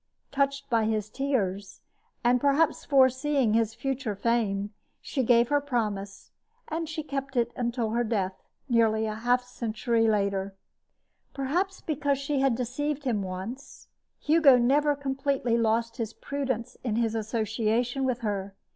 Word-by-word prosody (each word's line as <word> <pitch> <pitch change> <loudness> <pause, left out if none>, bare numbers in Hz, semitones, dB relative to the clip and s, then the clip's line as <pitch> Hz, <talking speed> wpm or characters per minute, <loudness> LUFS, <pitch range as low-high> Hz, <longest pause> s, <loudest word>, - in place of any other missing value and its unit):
Touched 275 0 0
by 230 -4 +2
his 215 -1 -1
tears, 205 -9 -2 0.4
and 245 +1 +3
perhaps 285 +2 +2
foreseeing 265 -2 +3
his 225 -1 +1
future 265 -5 -3
fame, 205 -2 0 0.3
she 270 - -2
gave 235 -1 +4
her 290 0 +3
promise, 210 -7 -3 0.4
and 320 0 -3
she 310 -1 -4
kept 275 -2 -5
it 235 0 +2
until 235 -2 -1
her 240 +2 +1
death, 195 -5 -2 0.3
nearly 225 -3 +3
half 240 +4 +1
a - - -22
century 230 -1 0
later. 200 -2 0 0.8
Perhaps 350 +8 -1
because 285 -2 0
she 280 +1 -1
had 270 -3 +3
deceived 275 +4 -2
him 235 -6 0
once, 190 +8 -7 0.3
Hugo 300 -4 +5
never 285 +4 +3
completely 270 -3 -1
lost 230 +1 +1
his 225 -2 -3
prudence 265 -5 -4
in 230 -4 -1
his 225 -1 +1
association 225 +3 -1
with 255 -1 -1
her. 200 -3 -3
240 Hz, 140 wpm, -27 LUFS, 220-275 Hz, 0.8 s, Hugo